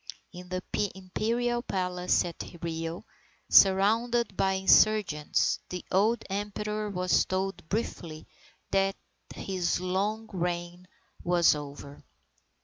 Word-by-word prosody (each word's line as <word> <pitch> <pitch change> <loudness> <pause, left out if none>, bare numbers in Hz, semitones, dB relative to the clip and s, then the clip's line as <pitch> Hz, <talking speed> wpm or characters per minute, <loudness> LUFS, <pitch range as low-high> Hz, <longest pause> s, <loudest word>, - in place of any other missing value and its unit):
In 180 0 -10
the 185 0 -3 0.3
Imperial 230 +6 -1
Palace 180 -5 0
at 170 - -6 0.2
Rio, 165 0 -4 0.5
surrounded 220 +4 +4
by 190 0 +1
insurgents, 190 -4 +3
the 180 -1 -6
old 215 +5 +2
Emperor 210 +1 -3
was 180 -2 +2
told 190 +1 -3
briefly 170 -7 -4 0.5
that 195 0 +2 0.4
his 180 -3 -1
long 200 +5 -1
reign 175 0 -3 0.4
was 175 -1 +4
over. 145 -1 -8
190 Hz, 100 wpm, -28 LUFS, 175-210 Hz, 0.5 s, surrounded